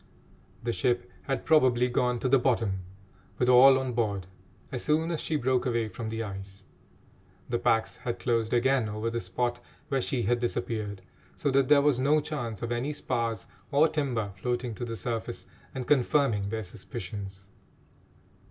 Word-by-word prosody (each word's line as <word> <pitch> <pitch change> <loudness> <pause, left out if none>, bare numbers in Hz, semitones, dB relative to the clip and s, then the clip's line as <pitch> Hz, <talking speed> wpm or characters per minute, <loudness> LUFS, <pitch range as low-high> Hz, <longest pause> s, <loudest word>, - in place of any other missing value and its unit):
The 120 0 -1
ship 120 -2 0
had 135 - -2
probably 130 -6 +4
gone 125 0 +1
to - - +1
the 135 +1 +5
bottom, 115 -6 +1 0.6
with 125 - +1
all 130 +2 +8
on 130 -2 -2
board, 105 -5 -1 0.5
as 125 -3 -3
soon 160 +2 +1
as 165 - -2
she 160 - -1
broke 130 -2 +1
away 115 -2 0
from 110 0 -5
the 110 +1 -3
ice. 95 -1 -8 0.8
The 120 -1 0
packs 110 0 +1
had 120 - -4
closed 115 -2 0
again 125 -2 +2
over 110 +2 -2
the 115 0 -2
spot 120 +7 -2 0.3
where 135 -1 +1
she 125 -1 -1
had 120 +1 +1
disappeared, 110 -5 -3 0.3
so 145 - 0
that 135 0 +3
there 145 0 +6
was 145 -4 +3
no 145 +4 +4
chance 120 -8 -4
of 120 - -3
any 125 +5 -1
spars 115 -7 -2 0.3
or 150 +3 +5
timber 130 -10 -1
floating 120 0 -1
to 120 - -5
the 115 -1 -5
surface 115 -1 -4 0.3
and 130 -2 -3
confirming 125 -7 +2
their 110 +1 -3
suspicions. 95 0 -7
120 Hz, 170 wpm, -28 LUFS, 110-130 Hz, 0.8 s, all